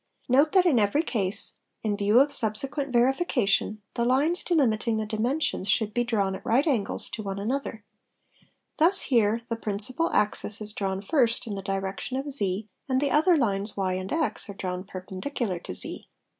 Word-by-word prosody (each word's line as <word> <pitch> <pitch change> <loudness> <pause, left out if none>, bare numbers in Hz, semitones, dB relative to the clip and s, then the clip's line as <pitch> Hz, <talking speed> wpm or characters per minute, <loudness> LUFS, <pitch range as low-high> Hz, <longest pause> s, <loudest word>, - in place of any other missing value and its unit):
Note 280 +5 +4
that 375 -2 +5
in 290 -9 +4
every 210 +10 +2
case, 200 - 0 0.2
in 210 -2 0
view 205 +3 +3
of 280 +2 +3
subsequent 270 +4 0
verification, 240 - +1
the 235 - -1
lines 280 +9 +2
delimiting 230 - +1
the 220 - -2
dimensions 225 +1 -1
should 210 +2 +1
be 240 - +1
drawn 205 -5 0
at 190 - -8
right 250 +6 +2
angles 250 -10 -1
to 220 - -6
one 195 -2 -5
another; 225 +1 -3 1.0
thus 360 +5 +6
here 230 -2 +1
the 230 - -2
principal 225 +9 -1
axis 210 0 +1
is 210 -1 -1
drawn 195 -1 -3
first 235 0 +1
in 220 - -5
the 195 - -5
direction 195 +5 -4
of 280 +2 -4
z 205 -5 +3 0.2
and 260 0 +2
the 280 0 0
other 320 +3 +4
lines 205 -5 -1
y 190 -2 0
and 185 +1 -5
x 315 -8 -2
are 200 - -7
drawn 185 -1 -4
perpendicular 190 - -5
to 90 - -7
z. - - -3
220 Hz, 180 wpm, -26 LUFS, 200-270 Hz, 1.0 s, thus